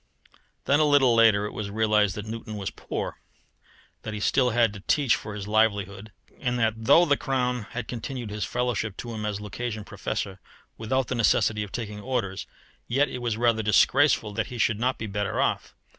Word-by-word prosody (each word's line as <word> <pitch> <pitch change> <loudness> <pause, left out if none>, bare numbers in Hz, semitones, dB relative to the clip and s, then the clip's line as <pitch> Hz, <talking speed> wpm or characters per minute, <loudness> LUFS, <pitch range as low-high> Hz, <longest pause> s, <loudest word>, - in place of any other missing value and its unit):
Then 140 +2 +3
a - - +5
little 140 -4 +5
later 110 -3 +5
it 105 - -4
was 105 -2 -5
realized 105 -2 +2
that 105 - -6
Newton 110 -1 -6
was 100 -2 -4
poor, - - -5 0.8
that 110 - -5
he - - -4
still 125 +4 +2
had 115 -3 +2
to 100 - -8
teach 140 -6 +3
for 105 -2 -7
his 100 -1 -6
livelihood, 105 -2 0 0.3
and 125 -2 -1
that 115 -2 +2
though 115 +10 +5
the 145 -3 +3
Crown 125 -5 -1
had 120 -2 -5
continued 120 -2 -5
his 105 0 -3
fellowship 120 -4 -2
to 120 -1 -6
him 105 -1 -3
as 105 -1 -3
Lucasian 105 +1 -5
Professor 95 -1 -4 0.4
without 130 +3 -1
the - - -2
necessity 110 -2 +2
of 105 -2 -5
taking 105 -3 -5
orders, 105 -5 -3 0.4
yet 140 +4 +2
it 125 - -5
was 115 -3 -1
rather 115 -1 +2
disgraceful 110 +2 +3
that - - -2
he 125 - -7
should 115 -1 +1
not 125 +2 0
be 110 - -5
better 100 -1 -2
off. - - -1
110 Hz, 195 wpm, -26 LUFS, 105-125 Hz, 0.8 s, a